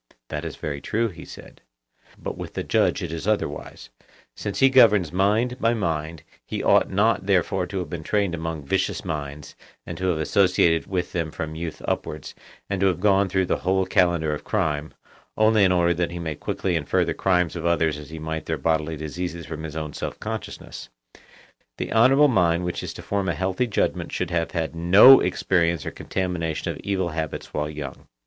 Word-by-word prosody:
That - - -4
is - - -5
very 70 -2 -5
true, 115 +1 0
he 85 -4 -11
said. - - -13 0.6
But - - -5
with - - -8
the - - -2
judge - - +1
it 85 - -4
is 85 +4 -5
otherwise; 100 - -3 0.4
since 105 -2 -4
he 135 - +6
governs 105 - +5
mind 110 +7 +1
by 115 +1 +2
mind; 80 -5 -3 0.2
he - - -4
ought - - +4
not 100 0 +1
therefore 95 -1 +1
to 100 - -5
have 90 -4 -3
been 85 - -4
trained 100 +2 0
among 80 -3 -4
vicious - - -1
minds, 75 -1 -5 0.3
and - - -7
to 95 - -1
have 90 -3 +1
associated 90 -1 +2
with 90 -2 -2
them 85 -3 -2
from 80 0 -5
youth 80 0 -6
upwards, 75 -2 -3 0.3
and 100 -1 -2
to 100 - +4
have 90 -3 0
gone 100 0 +3
through 95 0 +1
the - - 0
whole 95 +1 +1
calendar 85 -5 +2
of 75 - -5
crime, 80 -8 -1 0.5
only 110 -1 +4
in 95 - +4
order 85 -1 +3
that 85 0 -1
he 85 - -6
may 80 -2 -3
quickly 90 +4 -2
infer 75 -3 +1
the - - -1
crimes 90 -4 +1
of 85 0 -2
others 80 -3 +1
as 75 - -11
he 80 - -8
might 80 0 -5
their - - -1
bodily 80 -1 0
diseases 85 +2 -5
from 80 0 -6
his 80 -1 -7
own 75 -1 -4
self - - -5
consciousness; - - -7 0.9
the - - -4
honourable 135 +6 +6
mind 90 -8 +2
which 90 - -3
is - - -5
to - - -10
form 100 -2 -1
a 85 - -1
healthy 95 +8 -1
judgment 110 - -1
should 90 -1 -3
have 85 -1 0
had 80 -3 -3
no 95 +11 +8
experience 85 -4 +1
or - - -3
contamination 90 -4 -3
of - - -8
evil 95 -3 -1
habits 80 -2 -5
when 75 0 -2
young. 75 -3 -8
85 Hz, 200 wpm, -24 LUFS, 80-95 Hz, 0.9 s, no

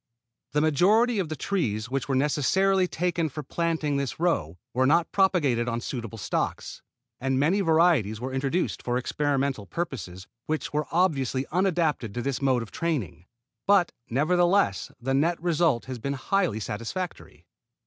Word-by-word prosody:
The 150 - +2
majority 205 - +3
of 175 -5 -1
the 155 - -3
trees 125 - -1
which 135 -2 -2
were 135 - +1
necessarily 180 +7 +2
taken 170 -2 -1
for 150 +2 -6
planting 160 -1 -1
this 140 +1 -3
row 90 - 0 0.2
were 130 +1 +2
not 165 +3 +3
propagated 145 -12 +2
on 115 0 -1
suitable 115 -2 -5
stocks, 100 - -3 0.4
and 135 0 0
many 175 +8 +2
varieties 160 - +3
were 130 +2 -5
introduced 135 +7 -1
for 120 0 -1
experimental 135 -4 -1
purposes 105 - -5 0.2
which 155 -1 -2
were 150 -1 0
obviously 140 -7 +1
unadapted 165 - 0
to 120 - -2
this 140 -1 -2
mode 130 -3 +2
of 110 - -12
training, 125 - -3 0.4
but 200 -3 +4 0.2
nevertheless 175 - +2
the 135 +2 -2
net 165 +5 +2
result 165 -6 +1
has 130 -2 -6
been 140 +4 -2
highly 140 - 0
satisfactory. 115 - -5
145 Hz, 150 wpm, -26 LUFS, 125-175 Hz, 0.4 s, but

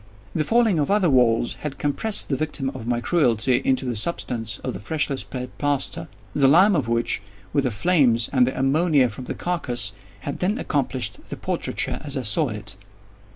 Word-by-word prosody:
The 155 - +1
falling 225 -3 +3
of 145 - 0
other 195 -5 +3
walls 120 -2 +3
had 150 -2 -5
compressed 200 +9 0
the 140 - +1
victim 135 -2 -2
of 120 -4 -8
my 120 -1 0
cruelty 125 -5 +2
into 130 0 +1
the 125 -2 -2
substance 115 -4 0
of - - -3
the - - -6
freshly 145 +4 -1
spread 125 -1 -6
plaster; 145 -11 0 0.3
the 140 -2 +4
lime 185 +8 +6
of 140 -8 0
which, 115 -4 0 0.3
with 140 - +2
the - - +2
flames, 120 -2 +2
and 125 -2 +4
the 130 - -2
ammonia 140 -1 +3
from 120 +4 -8
the - - -4
carcass, 120 - -1 0.3
had 140 - -5
then 200 +5 0
accomplished 130 - -2
the - - -5
portraiture - - -2
as 140 -1 -1
I 130 - -2
saw 125 +7 +1
it. 105 -3 -5
135 Hz, 190 wpm, -23 LUFS, 120-155 Hz, 0.3 s, lime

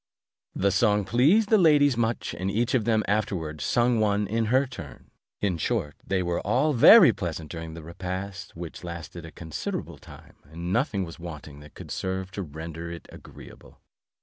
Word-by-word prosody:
The 100 +1 +2
song 105 0 +2
pleased 150 - +3
the 220 - +5
ladies 145 -5 +5
much, 115 0 -1
and 95 +1 -3
each 115 +5 0
of 120 -5 +2
them 110 -2 +2
afterwards 95 -7 -2
sung 120 -1 +2
one 105 -1 +1
in 115 +3 -1
her 130 +5 +3
turn. 80 - -11 0.3
In 95 -5 0
short, 75 -1 -1
they 95 -1 -1
were 85 -1 -1
all 130 +9 +1
very 120 - +8
pleasant 80 -2 -5
during 80 -1 -7
the 85 - -9
repast, 95 +3 -6
which 85 0 -8
lasted 85 -1 -8
a - - -11
considerable 80 -2 -6
time, - - -15
and 85 +4 -5
nothing 110 -4 0
was 85 -1 -9
wanting 75 -4 -9
that 75 0 -15
could - - -10
serve 95 0 -3
to 100 - -5
render 80 +1 -7
it 85 - -9
agreeable. - - -14
95 Hz, 175 wpm, -26 LUFS, 85-115 Hz, 0.3 s, very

